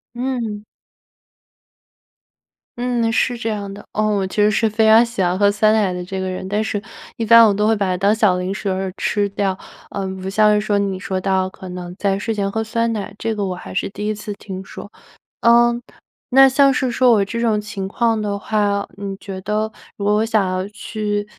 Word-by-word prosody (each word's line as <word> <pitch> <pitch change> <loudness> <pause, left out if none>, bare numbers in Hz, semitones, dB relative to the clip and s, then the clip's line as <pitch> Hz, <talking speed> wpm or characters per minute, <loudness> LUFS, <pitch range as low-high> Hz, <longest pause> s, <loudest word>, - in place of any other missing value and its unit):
嗯。 235 -5 -3 2.1
嗯， 240 -1 0
是 245 +2 +1
这 230 -1 -3
样 200 -2 -4
的。 200 - -12
嗯， 215 - +1
我 190 -1 -1
其 - - -9
实 210 0 +4
是 225 +1 +2
非 220 +1 +2
常 220 +2 +7
喜 230 -4 -4
欢 180 +1 0
喝 200 -1 +5
酸 215 +1 +3
奶 205 -4 +2
的 180 0 -4
这 190 +2 -5
个 190 0 -2
人， 185 0 -5
但 205 +2 0
是 215 -2 -2 0.3
一 230 - -3
般 230 +1 +8
我 205 - +3
都 210 +1 0
会 220 - +4
把 205 -2 0
它 185 - 0
当 200 +3 +2
小 210 -4 +3
零 180 +1 -2
食 200 - -5
然 190 -1 0
后 190 0 -3
吃 205 -1 0
掉。 195 -1 -1 0.3
嗯， 190 -1 -4
不 190 - -4
像 210 +2 +4
是 210 - +3
说 210 -1 0
你 195 -2 -1
说 190 0 -3
到 190 -1 +1
可 185 0 -11
能 180 0 -7
在 195 -2 0
睡 225 +2 -2
前 200 -2 -2
喝 220 - -1
酸 230 +1 -1
奶， 205 -2 -5
这 225 0 -2
个 205 -2 -2
我 185 -1 -3
还 - - -9
是 195 - -1
第 205 +1 -6
一 215 - 0
次 210 0 -6
听 190 -1 -8
说。 205 - -10 0.5
呃， 235 +1 +5 0.6
那 270 +1 +7
像 275 +1 +4
是 255 -1 0
说 245 0 +4
我 205 -3 +3
这 205 +4 -4
种 220 -3 +1
情 200 -2 -5
况 225 +2 0
的 205 -1 -2
话， 205 -1 0
你 200 -1 -5
觉 195 -1 -7
得 215 +2 -1 0.2
如 200 - -6
果 205 +1 +2
我 215 +1 +2
想 220 -3 +2
要 185 +1 -2
去 210 0 -3
205 Hz, 240 characters per minute, -20 LUFS, 195-220 Hz, 2.1 s, 般